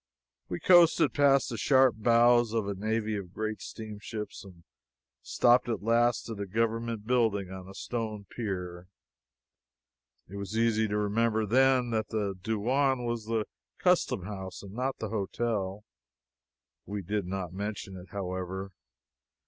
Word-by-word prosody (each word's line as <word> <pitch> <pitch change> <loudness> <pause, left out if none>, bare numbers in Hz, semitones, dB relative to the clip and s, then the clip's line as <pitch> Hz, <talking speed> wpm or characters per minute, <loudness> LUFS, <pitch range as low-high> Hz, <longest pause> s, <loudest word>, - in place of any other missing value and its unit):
We 90 - -3
coasted 175 -2 +5
past 140 -2 +4
the 115 - -4
sharp 130 +1 +5
bows 120 +1 +4
of 110 -3 0
a 100 - -1
navy 110 +2 -1
of 95 -3 -7
great 110 -1 -3
steamships 105 0 -7
and 90 -4 -15 0.6
stopped 120 - +3
at 115 -4 -2
last 120 +2 +2
at 110 -3 -6
a 100 - -3
government 115 +1 -1
building 110 -6 +1
on 95 0 -8
a 95 - -11
stone 110 -4 -4
pier. 90 -5 -4 1.4
It 100 - -8
was 100 +2 -4
easy 115 -1 +2
to 105 0 -1
remember 110 +1 +1
then 130 +2 +3
that 110 -1 0
the 105 -3 -2
douain 125 +5 +1
was 120 -2 -2
the 110 -1 -1 0.3
customhouse 95 0 0
and 100 -1 -10
not 130 +3 -2
the 110 - -4
hotel. 105 -1 -2 1.0
We 100 -1 -4
did 100 +1 -2
not 90 -2 -4
mention 100 0 -5
it, 90 0 -11
however. 95 -1 -4
110 Hz, 140 wpm, -29 LUFS, 100-115 Hz, 1.4 s, coasted